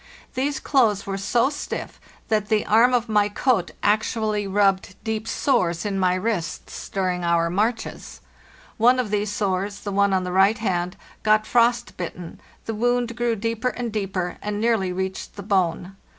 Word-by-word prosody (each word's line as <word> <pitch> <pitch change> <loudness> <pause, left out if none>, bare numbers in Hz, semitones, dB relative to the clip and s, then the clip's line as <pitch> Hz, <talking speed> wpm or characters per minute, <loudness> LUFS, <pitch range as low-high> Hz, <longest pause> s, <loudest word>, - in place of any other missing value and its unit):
These 270 +1 -1
clothes 225 -10 +2
were 195 - -3
so 235 +7 +2
stiff 290 - -6 0.3
that 215 -2 +1
the 215 -2 +2
arm 230 +4 +5
of 245 -1 +1
my 210 -1 +2
coat 205 -4 +1
actually 215 0 +1
rubbed 195 -1 +1
deep 220 -1 -3
sores 175 - +1
in 195 -2 -1
my 185 -1 +3
wrists 185 -5 -3
during 185 -2 -1
our 170 -1 +2
marches; 225 +5 -2 0.6
one 245 +3 +5
of 230 -5 -1
these 210 0 0
sores—the 200 0 -2
one 200 0 +3
on 190 -1 +1
the 180 - -4
right 195 +4 +4
hand—got 215 +2 -1
frost 235 +1 +2
bitten, 175 -1 -7 0.2
the 225 - -3
wound 240 +1 0
grew 240 -1 0
deeper 230 +3 -1
and 240 -2 -5
deeper, 190 -4 -2
and 210 0 -3
nearly 220 -5 +1
reached 190 +1 -4
the 200 - -7
bone. 185 -2 0
210 Hz, 160 wpm, -23 LUFS, 190-230 Hz, 0.6 s, arm